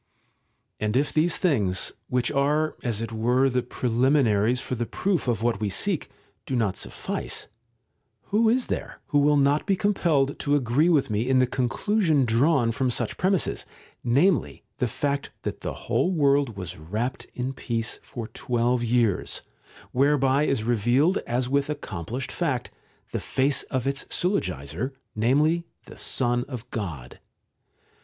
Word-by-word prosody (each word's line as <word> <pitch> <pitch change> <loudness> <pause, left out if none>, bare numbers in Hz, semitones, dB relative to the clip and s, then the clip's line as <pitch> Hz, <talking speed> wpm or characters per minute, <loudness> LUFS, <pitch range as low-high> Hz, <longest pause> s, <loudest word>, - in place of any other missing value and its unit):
§ - - -47 0.8
9 110 - +1
And 105 +4 +1
if 145 +2 +1
these 165 +3 +2
things, 105 - +1 0.2
which 125 -1 0
are 150 +3 +1
as 115 -4 -2
it 115 0 -4
were 125 +4 +2
the 125 0 +1
pre 125 - -4
liminaries 120 -2 +3
for 130 - -5
the 120 -1 -2
proof 185 -8 -1
of 115 -2 0
what 115 -4 +1
we 105 -2 -1
seek, 170 - -1 0.4
do 130 - -1
not 110 -6 +1
suffice, - - -4 0.8
who 220 +2 +4
is 245 +2 +2
there - - -4
who 145 - +3
will 145 +1 +4
not 140 +4 +2
be 195 - +3
compelled 165 -9 +1
to 145 0 +1
agree 140 +5 +2
with 145 -9 +2
me 110 +4 0
in 130 - +4
the 130 - +5
conclusion 145 - +1
drawn 120 +1 +3
from 130 +2 0
such 120 -2 -1
premisses, 190 -1 0 0.4
namely 125 - +2 0.2
the 125 - +1
fact 140 +4 -2
that - - -4
the - - -3
whole - - +1
world 140 - +2
was 90 -1 -6
wrapped 110 +11 -3
in 125 +2 -2
peace 115 -3 -3
for 115 -3 -7
twelve 120 0 0
years, 115 -4 +1 0.5
whereby 135 +1 +3
is 135 -6 0
revealed, 120 - +2
as 125 +1 0
with 140 +2 +1
accomplished 120 - -4
fact, - - -2 0.4
the - - -2
face 135 +1 +1
of 130 -1 -1
its 140 0 -1
Syllogizer, 130 - -1 0.2
namely 150 +10 +2 0.2
the - - -12
Son 120 -1 +1
of 125 -3 -7
God 80 - -5
130 Hz, 160 wpm, -25 LUFS, 115-145 Hz, 0.8 s, the